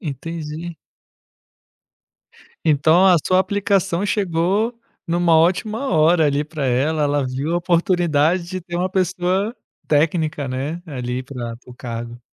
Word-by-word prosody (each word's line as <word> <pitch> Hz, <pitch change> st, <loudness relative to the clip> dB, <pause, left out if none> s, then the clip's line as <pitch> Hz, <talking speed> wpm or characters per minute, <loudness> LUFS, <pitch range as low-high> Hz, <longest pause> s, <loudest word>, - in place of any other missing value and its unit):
Entendi. 160 Hz, -, -6 dB, 1.9 s
Então 160 Hz, +5 st, +4 dB
a 185 Hz, -, +7 dB
sua 185 Hz, -, +3 dB
aplicação 195 Hz, -1 st, +1 dB
chegou 200 Hz, +3 st, 0 dB, 0.3 s
em 170 Hz, -, -1 dB
uma 170 Hz, -2 st, +4 dB
ótima 215 Hz, +10 st, +1 dB
hora 160 Hz, +1 st, +4 dB
ali 145 Hz, 0 st, +1 dB
para 150 Hz, -3 st, -4 dB
ela. 145 Hz, +5 st, +1 dB
Ela 145 Hz, -1 st, +1 dB
viu 135 Hz, +6 st, -2 dB
a -, -, +2 dB
oportunidade 175 Hz, -2 st, +2 dB
de 185 Hz, +2 st, -6 dB
ter 175 Hz, 0 st, -9 dB
uma 180 Hz, +2 st, 0 dB
pessoa 190 Hz, +4 st, 0 dB, 0.3 s
técnica, 155 Hz, -2 st, +1 dB
né, 140 Hz, +7 st, -4 dB
ali 125 Hz, -5 st, -4 dB
para 120 Hz, -3 st, -6 dB
para 125 Hz, -, -17 dB
o 125 Hz, -, -11 dB
cargo. 120 Hz, -1 st, -7 dB
165 Hz, 135 wpm, -20 LUFS, 145-185 Hz, 1.9 s, a